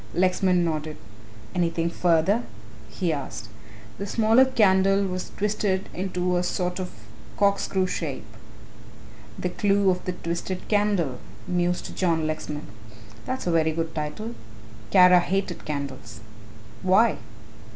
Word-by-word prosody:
Lexman 185 -1 +2
nodded. 155 -1 -3 0.6
"Anything 170 -2 0
further?" 175 +6 +2 0.5
he 175 -4 -1
asked. 120 -7 -6 0.5
"The 200 - -3
smaller 225 +5 +5
candle 195 -5 +3
was 185 -1 -4
twisted 200 -2 0
into 180 -1 -1
a - - +2
sort 180 0 -2
of 185 -1 -3 0.5
corkscrew 200 -2 +2
shape." 185 - -4 1.1
"The - - -2
Clue 200 -2 +2
of 180 0 -3
the 180 - -2
Twisted 170 +2 -4
Candle," 200 - +1 0.3
mused 180 0 -1
John 165 -4 +1
Lexman 155 -1 -4 0.6
"that's 260 +1 -3
a 175 - +1
very 160 -1 +2
good 165 0 -3
title 160 +10 -4 0.6
Kara 180 +5 +7
hated 185 0 -2
candles." 135 -6 -5 0.6
"Why?" 190 +5 +4
180 Hz, 120 wpm, -25 LUFS, 165-195 Hz, 1.1 s, Kara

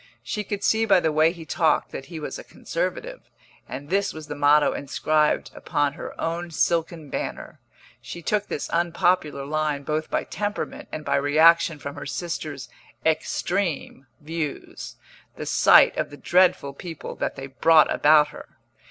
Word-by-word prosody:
She 210 - -3
could 205 0 -5
see 220 0 +3
by 195 -4 +5
the 160 -2 0
way 155 +2 +4
he 170 -2 -10
talked 160 0 +1
that 135 - -7
he 170 -2 -7
was 150 - -6
a - - -9
conservative, - - -5 0.4
and 145 +4 -7
this 200 +1 +1
was 155 -1 -8
the 150 0 -6
motto 145 +1 +4
inscribed 150 +2 0
upon 145 -1 -1
her - - -9
own 170 +1 -3
silken 165 -2 -1
banner. - - -5 0.4
She 170 - -9
took 210 +2 0
this 145 - -4
unpopular 170 -3 +1
line 150 -1 -1
both 155 +2 -2
by - - 0
temperament 205 +1 -4
and 155 - -6
by - - +1
reaction 155 +3 +4
from 140 0 -7
her - - -6
sister's 155 -6 -5 0.4
"extreme" 160 -2 -1
views, 155 -1 -6 0.4
the - - -6
sight - - +6
of - - -1
the 145 - -11
dreadful 180 -6 +2
people 165 +2 -8
that - - -2
they 135 - -7
brought 155 +4 +4
about 150 0 +5
her. - - -12
155 Hz, 160 wpm, -24 LUFS, 145-175 Hz, 0.4 s, sight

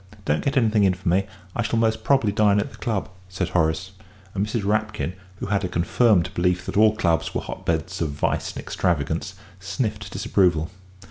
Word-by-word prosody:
Don't 75 - +1
get 140 - 0
anything 110 -4 +3
in 95 -2 +3
for 95 +1 -9
me; 95 +3 +2 0.3
I - - 0
shall 115 0 0
most 110 -1 +1
probably 135 -6 +3
dine 105 0 +3
at 120 +7 -2
the - - -14
club," 110 -6 -2 0.2
said 95 -1 -2
Horace; 85 +2 0 0.4
and 100 - 0
Mrs. 105 0 -2
Rapkin, 105 -2 0 0.2
who - - -5
had 100 0 0
a - - 0
confirmed 90 +1 +2
belief 90 +1 +1
that - - -5
all 110 +1 +5
clubs 85 -7 0
were - - 0
hotbeds 85 +3 -3
of 80 - 0
vice 70 - -1
and - - -5
extravagance, 85 +2 -1 0.2
sniffed 105 +1 -3
disapproval. 90 -5 +1
95 Hz, 190 wpm, -24 LUFS, 90-110 Hz, 0.4 s, all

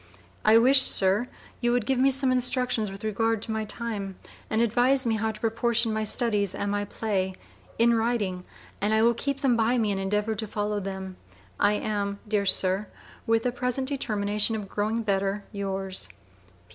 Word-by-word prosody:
I 215 +1 +6
wish, 265 +4 +6
Sir, 200 0 +3 0.3
you 240 -1 +1
would 245 -2 +1
give 265 +1 +1
me 270 +1 +5
some 270 -1 +1
instructions 250 -3 0
with 195 +1 -10
regard 225 +1 0
to 225 - -5
my 220 0 -2
time, 210 -4 -3 0.3
and 220 - 0
advise 245 +4 +3
me 225 -1 +1
how 220 +1 -1
to 215 - -11
proportion 230 0 +1
my 215 0 -1
Studies 210 -4 0
and 200 - -2
my 205 0 -1
Play, 190 -3 -2 0.4
in 235 +1 +4
writing, 225 -6 0 0.4
and 210 +2 +2
I 220 - +3
will 235 +1 +5
keep 275 +3 -3
them 265 -4 +3
by 230 +2 +2
me 220 -3 +1
and 195 -1 -2
endeavor 210 +3 0
to 220 +1 -4
follow 210 0 -2
them. 190 -1 -6 0.4
I 205 +1 +4
am, 205 -1 -2
dear 205 -2 0
Sir, 190 +2 +2 0.4
with 225 +1 +2
a 250 - +2
present 250 +2 -2
determination 210 -5 0
of 210 -2 -5
growing 215 +3 -1
better. 200 0 0
Yours. 195 -2 -3
220 Hz, 185 wpm, -26 LUFS, 200-235 Hz, 0.4 s, I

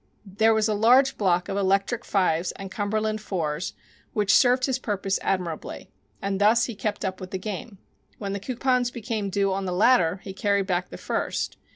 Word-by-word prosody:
There 220 +3 +2
was 220 0 +2
a 215 - +1
large 245 +6 +4
block 180 -3 +1
of 195 - -3
Electric 195 +4 +1
5s 180 -3 +1
and 195 -1 -8
Cumberland 215 +1 -1
4s 175 -5 -3 0.4
which 205 -3 +2
served 255 +1 +5
his 265 -1 -1
purpose 195 -4 -1
admirably, 180 -4 -3 0.3
and 195 0 -1
thus 225 +3 +5
he 235 - -5
kept 210 +1 -3
up 190 0 -4
with 185 - -7
the 190 - -3
game. 200 +2 -6 0.4
When 200 -2 -4
the 200 - -3
coupons 250 +2 0
became 225 -4 -3
due 195 0 +1
on 195 0 -2
the 185 - -2
latter 180 -2 +3
he 195 - -7
carried 200 0 +1
back 180 -1 -1
the - - -8
first. - - -2
200 Hz, 190 wpm, -25 LUFS, 190-220 Hz, 0.4 s, served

